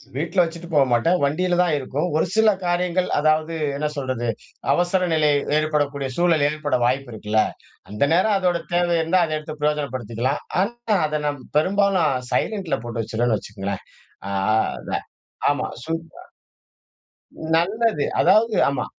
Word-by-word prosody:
வீட்டுல 165 +6 +1
வச்சுட்டு 170 0 -6
போ 150 - +5
மாட்டேன். 120 +9 +3
வண்டியில 175 +6 +1
தான் 175 -4 +2
இருக்கும். 140 +4 -2
ஒரு 160 - +2
சில 220 0 +5 0.2
காரியங்கள், 180 +1 0
அதாவது 155 +2 +2 0.2
என்ன 150 +2 -1
சொல்றது, 130 -3 -2 0.5
அவசர 180 +3 +1
நிலை 155 -2 +3 0.3
ஏற்படக்கூடிய 145 -3 0
சூழல் 170 -4 +3
ஏற்பட 150 -2 -1
வாய்ப்பு 130 +1 0
இருக்குல்ல. 110 0 +1 0.5
அந்த 105 +6 0
நேரம் 195 +5 +3
அதோட 180 -2 +1
தேவை 175 -1 +2
இருந்தா, 170 +3 +2
அதை 155 -1 -2
எடுத்து 155 0 -8
பிரயோஜனப்படுத்திக்கலாம். 130 -4 -1 0.2
ஆனா, 230 +1 -1
அத 150 0 -2
நாம் 145 -1 -2 0.2
பெரும்பாலும் 190 -1 +2 0.2
சைலன்ட்ல 195 -6 0
போட்டு 120 -1 -3
வச்சுருவேன்னு 115 +1 0
வச்சுக்கோங்களேன். 100 -1 -6 0.5
அ - - -3 0.4
அதான் - - -4 0.4
ஆமா 145 - 0 0.2
சு 160 - -6 1.6
நல்லது. 200 0 +1
அதாவது 220 0 +4
ஆமா, 140 -2 -2
155 Hz, 135 wpm, -22 LUFS, 140-180 Hz, 1.6 s, போ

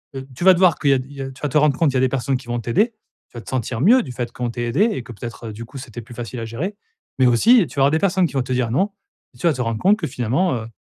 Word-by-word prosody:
,heu, 135 0 -6
tu 175 - -5
vas 190 - +9
devoir 180 -2 +3
qu'il 140 - +2
y - - +6
a 135 - +3
il 130 +2 -7
y 140 - -7
a 135 - -4
tu 135 - -16
vas 150 - -1
te 145 - +1
rendre 150 -2 +3
compte 160 -4 +2
il - - -7
y - - +4
a - - +3
des 130 - +3
personnes 130 0 -1
qui 125 - -14
vont 120 0 -2
t'aider. 210 - +1 0.4
Tu 120 - -13
vas - - -6
te - - -12
sentir 125 -2 -2
mieux, 240 - +6
du 130 - -8
fait 120 0 -4
qu'on 120 0 -3
t'ait 120 +1 -4
aidée 180 - +2
et 130 - -5
que 120 - -11
peut-être, 115 0 -8
du 115 +2 -8
coup, 135 - -11
c'était 120 -3 -8
plus 120 +2 -13
facile 120 +1 -6
à 115 - -4
gérer, 145 - -4 0.4
mais 130 - +5
aussi, 185 - +5
tu 135 - -6
auras 135 - +5
des 160 - +2
personnes 190 -2 +2
qui 140 - -12
vont 135 -2 0
te 130 +1 -3
dire: 125 -2 0
«Non» 195 - +1 0.4
et - - -17
tu - - -4
vas - - +5
te 125 - -4
rendre 115 -2 -2
compte 205 - +4
que - - -2
finalement, 130 +8 0
heu, 110 -2 -5
130 Hz, 350 wpm, -21 LUFS, 120-160 Hz, 0.4 s, vas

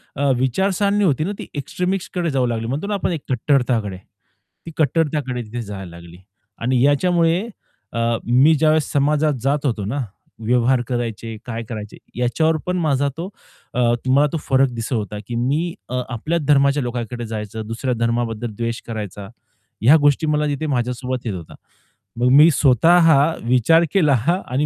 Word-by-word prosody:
अ, 140 0 +1
विचारसरणी 195 - +1
होती 155 -4 +2
ना, 195 - -2
ती - - -7
एक्सट्रीमिस्टकडे 180 +3 -2
जाऊ 130 -2 +1
लागली 115 -1 -2
म्हणतो 145 +10 -3
ना, 210 - -2
आपण 195 - -1
एक 160 -4 -3
कट्टरताकडे 125 -6 0 0.7
ती 165 - -7
कट्टरताकडे 150 -4 0
तिथे 120 +3 -6
जायला 100 -4 -7
लागली. 85 0 -12 0.4
आणि 125 +1 +1
याच्यामुळे 165 +4 +3 0.5
अ, 115 - -2 0.3
मी 130 +7 +5
ज्यावेळेस 155 0 +2
समाजात 150 +2 +2
जात 145 +1 0
होतो 110 -6 -1
ना 120 +8 -3 0.5
व्यवहार 125 +1 +2
करायचे, 115 -2 -4
काय 115 -1 -5
करायचे 105 -3 -7 0.2
याच्यावर 155 +7 +1
पण 180 0 -1
माझा 145 -4 +1
तो 180 +4 -5 0.4
अ, 125 - -2 0.3
मला 140 +3 +4
तो 165 - 0
फरक 135 0 +4
दिसत 115 +2 -4
होता 105 -2 -3
की 120 - -4
मी 145 +8 0 0.2
अ, 125 0 -1
आपल्या 155 +8 -2
धर्माच्या 140 -1 +3
लोकांकडे 120 0 -4
जायचं, 110 0 -5
दुसऱ्या 125 +3 -2
धर्माबद्दल 115 -1 -1
द्वेष 115 0 -3
करायचा, 105 -3 -6 0.5
ह्या 130 +8 +7
गोष्टी 145 +2 +3
मला 150 0 +1
तिथे 145 +2 -2
माझ्यासोबत 125 -1 -2
येत 110 - -2
होत्या. 85 -3 -9 0.6
मग 125 +1 +3
मी 150 +3 +8
स्वतः 160 +5 +4 0.4
विचार 130 +7 +4
केला 155 -8 +4 0.3
आणि 135 +4 0
130 Hz, 160 wpm, -20 LUFS, 115-155 Hz, 0.7 s, मी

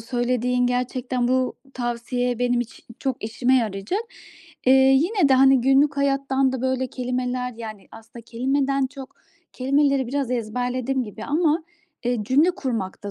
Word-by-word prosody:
söylediğin. 245 +1 0
Gerçekten 250 0 -1
bu 255 0 +1 0.2
tavsiye 245 0 -2
benim 245 0 +1
için 240 - -8
çok 260 -5 -3
işime 245 +4 +1
yarayacak. 215 - -1 0.7
Eee, 260 - +7
yine 275 +7 +4
de, 265 - +5
hani, 265 -1 +5
günlük 270 +3 +3
hayattan 275 -1 +1
da 260 -1 -4
böyle 260 0 0
kelimeler 250 0 -3
Yani, 215 -4 -8
aslında 225 +1 -13
kelimeden 270 +3 0
çok 270 -1 -11 0.4
kelimeleri 275 0 +1
biraz 270 0 -2
ezberledim 250 +2 -1
gibi 215 +1 -9
ama, 315 +1 +1 0.4
eee, 245 0 0
cümle 290 - +4
kurmakta 225 - -4
255 Hz, 135 wpm, -23 LUFS, 240-270 Hz, 0.7 s, Eee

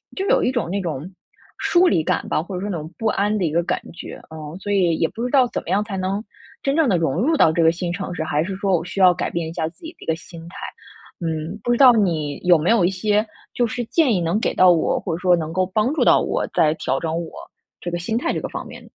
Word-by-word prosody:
就 385 - -2
有 - - +3
一 255 - +2
种 240 -9 -2
那 200 +2 -1
种 165 -1 -4 0.5
疏 355 +1 +3
离 160 - +2
感 - - -1
吧， - - +1
或 185 +1 -7
者 180 - -4
说 205 - -3
那 175 - -2
种 155 +2 -8
不 225 - -1
安 210 0 +1
的 190 - -1
一 155 - -1
个 170 +1 +1
感 - - -1
觉， - - -9
嗯， 155 0 -8
所 205 +1 -4
以 180 -5 +3
也 165 - +2
不 230 - -6
知 250 - -1
道 265 -3 +5
怎 - - -4
么 - - -9
样 205 +2 +2
才 205 -2 -5
能 190 +3 -2 0.4
真 275 0 +1
正 320 -4 +3
地 185 - +3
融 160 -5 0
入 285 - +2
到 160 - +5
这 165 +1 +1
个 165 - +6
新 170 0 -4
城 185 0 -4
市， 160 - -2
还 150 0 0
是 190 +1 -4
说 195 -2 +1
我 165 - -5
需 195 - -6
要 185 - +8
改 - - -3
变 165 -1 -3
一 - - -8
下 160 -3 -2
自 165 - -13
己 325 - -6
的 - - -50
一 - - -10
个 160 - 0
心 165 +1 -12
态。 - - -15 0.7
嗯， 160 +4 -3
不 240 - 0
知 240 - +2
道 255 -3 +8
你 160 -9 0
有 175 -2 +6
没 160 +6 -1
有 225 -6 +4
一 175 - +4
些 210 +3 +1 0.3
就 240 - +1
是 240 +2 -3
建 285 -3 +2
议 185 - +1
能 170 +5 0
给 - - -1
到 185 -1 +6
我， 165 - +1
或 - - -4
者 - - -7
说 180 -1 +4
能 160 -1 -4
够 185 +1 +1
帮 215 +8 0
助 - - +1
到 - - +5
我， - - -1
在 155 0 +3
调 135 -3 -1
整 160 -1 -3
我 170 -1 -4 0.5
这 175 - -5
个 175 - -2
心 180 +6 -2
态 245 - -1
这 - - -3
个 - - -4
方 - - -6
面。 - - -11
180 Hz, 320 characters per minute, -21 LUFS, 165-215 Hz, 0.7 s, 要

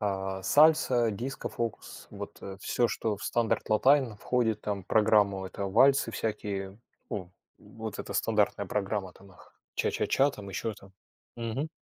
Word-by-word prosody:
А, 95 -2 -2
сальса, 135 -6 +4
дискофокус, 115 0 -5
вот, - - -8
э, 95 -1 -7
всё, 120 +3 +1
что 110 -2 -2
в - - -12
стандарт 115 -2 0
латайн 130 +1 +4
входит 115 0 0
там 100 -2 -3
в - - -25
программу,- 105 -3 +3
это 100 +1 -4
вальсы 130 +5 +4
всякие, 100 -3 -3 0.3
ну, 90 -4 -5 0.3
вот - - -7
эта - - -7
стандартная - - +1
программа, 100 -2 -2
танах, 95 -2 -18 0.2
ча-ча-ча 140 +2 +2
там, 100 -5 -9
ещё 105 +3 -3
там. 95 -1 -17 0.4
Мгм. 120 +6 -3
105 Hz, 140 wpm, -29 LUFS, 100-120 Hz, 0.4 s, сальса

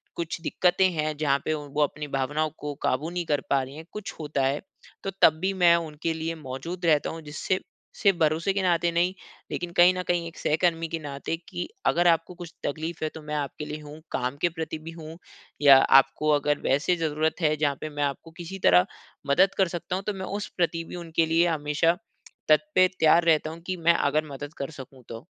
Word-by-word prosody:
कुछ 170 0 -4
दिक्कतें 180 +2 +2
हैं 155 -1 -1
जहाँ 140 -2 +2
पे 155 - +1
वो 150 -1 -3
अपनी 150 +1 -3
भावनाओं 145 +3 -1
को 150 0 -4
काबू 145 +6 0
नहीं 175 0 -3
कर 145 -3 0
पा 140 - +3
रही 135 +2 -9
है 160 - -8
कुछ 210 -1 -6
होता 150 -3 -2
है 140 +2 0 0.4
तो 195 - -2
तब 155 - +8
भी 190 +1 +1
मैं 175 -3 +5
उनके 165 -1 -2
लिए 160 +1 -3
मौजूद 160 +5 -6
रहता 155 -3 +3
हूँ। 165 - -7
जिससे 155 +5 -2 0.4
सिर्फ़ 200 -4 +3
भरोसे 160 +4 +2
के 200 - 0
नाते 175 -1 +2
नहीं 175 +2 +1 0.4
लेकिन 175 -1 -4
कहीं 175 +1 +7
न 180 - -2
कहीं 175 -1 0
एक 165 - -11
सहकर्मी 165 +1 +1
के 165 0 -4
नाते 145 +1 -4
कि 175 - -4 0.2
अगर 175 +1 +3
आपको 165 +1 +2
कुछ 175 -1 -9
तकलीफ़ 160 +3 -3
है 155 - 0
तो 160 - -8
मैं 150 0 -5
आपके 145 +1 -4
लिए 150 +1 -6
हूँ। 150 +1 -10
काम 125 +3 -2
के 175 - +3
प्रति 160 -1 -5
भी 160 +1 -8
हूँ 165 -1 -10 0.4
या 140 -2 +9 0.2
आपको 135 +3 -1
अगर 145 0 0
वैसे 145 +7 +2
ज़रूरत 160 +1 -1
है 155 -1 +3
जहाँ 145 -2 +1
पे 155 - -4
मैं 145 -1 -3
आपको 145 +3 -3
किसी 185 +3 -7
तरह 90 0 +6 0.4
मदद 185 +8 +4
कर 190 - +4
सकता 175 +1 -3
हूँ। 195 - -5
तो 210 - 0
मैं 190 -1 -5
उस 205 - -5
प्रति 170 -1 0
भी - - -9
उनके 165 -2 0
लिए 165 +2 +3
हमेशा 160 +1 +1 0.5
तत् 155 0 +4
पे 185 0 +6
तैयार 160 +2 +5
रहता 155 -1 +3
हूँ 165 +1 -10
कि 185 -1 -2
मैं 170 0 +4
अगर 155 +2 +1
मदद 145 +2 -7
कर 140 - -3
सकूँ 130 0 -14
तो। 115 +4 -8
160 Hz, 220 wpm, -26 LUFS, 150-170 Hz, 0.5 s, या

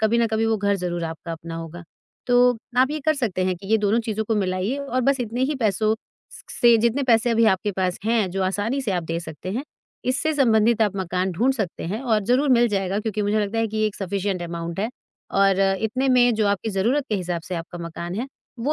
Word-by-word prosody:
कभी 220 +2 +2
ना 235 - +3
कभी 220 0 0
वे 225 -1 +2
घर 200 0 +1
ज़रूर 175 -2 -3
आपका 165 +1 -6
अपना 165 0 -7
होगा। 165 +1 -7 0.4
तो 245 0 +4 0.2
आप 260 +2 +4
ये 305 - -2
कर 310 - +4
सकते 215 -10 -1
हैं 185 0 +1
कि 195 - -12
ये 220 - +4
दोनों 210 +2 +2
चीज़ों 220 -1 -3
को 225 - 0
मिलाइए 190 +5 -1
और 275 -2 -2
बस 275 -2 +2
इतने 245 +2 -2
ही 295 +2 -1
पैसों 215 0 +2 0.4
स - - -12 0.2
से 235 -1 +7
जितने 235 +5 +1
पैसे 240 -2 +3
अभी 230 0 +3
आपके 200 0 +2
पास 185 -1 -1
हैं, 220 -5 +1
जो 190 +1 -2
आसानी 205 +8 -1
से 235 - -2
आप 175 - -1
दे 165 +1 -2
सकते 170 +2 -7
हैं, 250 +7 -3 0.4
इससे 275 +5 0
संबंधित 230 -4 +3
आप 205 -2 0
मकान 185 0 -1
ढूँढ 240 +10 +2
सकते 205 -8 -4
हैं 200 +7 -3
और 225 -5 +2
ज़रूर 260 +5 +2
मिल 240 -1 +5
जाएगा 195 -1 -1
क्योंकि 210 -1 -2
मुझे 210 +1 +1
लगता 210 +2 -2
है 225 - +2
कि 220 - -5
ये 215 0 +2
एक 210 - -4
सफिशन्ट 195 -1 -2
अमाउन्ट 170 +1 -5
है 220 - 0 0.5
और 195 -1 +4 0.2
इतने 255 +5 0
में 245 -1 +5
जो 215 -1 +1
आपकी 200 +2 -1
ज़रूरत 235 +9 +1
के 215 - 0
हिसाब 175 -2 -3
से 185 - -3
आपका 170 +1 -6
मकान 170 +1 -6
है, 235 +6 -3 0.3
वो 275 +6 0
215 Hz, 240 wpm, -23 LUFS, 185-235 Hz, 0.5 s, से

